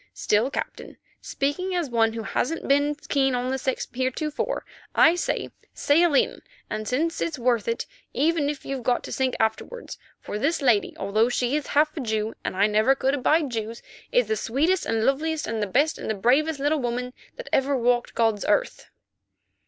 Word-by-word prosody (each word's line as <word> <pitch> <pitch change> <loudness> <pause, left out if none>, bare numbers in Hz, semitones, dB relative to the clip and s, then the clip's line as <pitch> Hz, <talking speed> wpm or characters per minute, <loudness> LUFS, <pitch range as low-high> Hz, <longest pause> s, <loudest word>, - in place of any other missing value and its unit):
Still, 215 +5 +1
Captain, - - -6 0.2
speaking 360 +7 -2
as 345 -4 0
one 225 -1 +2
who 225 -1 -4
hasn't 320 +8 -2
been 285 +2 +3
keen 270 -2 +2
on 250 +1 -1
the 265 - -1
sex 260 0 -2
heretofore, 260 +4 -2 0.3
I 330 - +6
say—sail 335 -2 0
in, - - +2 0.4
since 315 +8 -1
it's 325 -3 -2
worth 240 -3 +1
it, 230 0 -1 0.3
even 305 -1 +1
if 295 -2 -5
you've 270 -1 -3
got 245 +1 0
to - - -8
sink 260 -1 0
afterwards, 220 - -2 0.2
for 210 - -5
this 320 +8 +1
lady, 240 -8 +2
although 215 +4 +1
she 245 +2 0
is 300 - -2
half 300 +1 +2
a - - -4
Jew, 220 -3 -2
and - - -3
I 200 - +5
never 215 +5 +3
could 270 0 0
abide 290 +1 +2
Jews, 225 0 -4 0.3
is - - +3
the 440 - -1
sweetest 320 - 0
and 225 0 0
the - - +1
loveliest 305 +3 0
and 225 -1 -3
the 210 - 0
best 285 +10 +1
and - - -5
the 220 - 0
bravest 275 +9 +2
little 290 +2 +1
woman 250 0 -3 0.2
that - - -9
ever 270 +1 +2
walked 240 0 +1
God's 225 -3 +1
earth." - - 0
265 Hz, 185 wpm, -25 LUFS, 230-300 Hz, 0.4 s, I